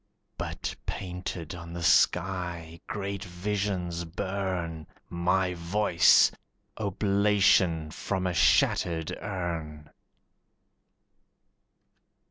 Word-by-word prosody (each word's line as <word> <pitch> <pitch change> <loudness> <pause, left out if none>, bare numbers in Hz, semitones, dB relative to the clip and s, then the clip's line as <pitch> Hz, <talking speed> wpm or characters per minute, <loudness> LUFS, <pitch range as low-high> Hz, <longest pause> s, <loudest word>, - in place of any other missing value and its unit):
But - - -4
painted 90 -3 -5
on 85 -1 -8
the 85 0 -5
sky 85 -2 +1
great 100 -1 -4
visions 90 -2 -2
burn, 90 -2 -3 0.2
My 90 +2 +1
voice, 85 0 +4 0.5
oblation 100 -5 +2
from 95 +3 -3
a 90 - 0
shattered 80 0 +2
urn! 80 -5 -5
90 Hz, 75 wpm, -28 LUFS, 85-95 Hz, 0.5 s, voice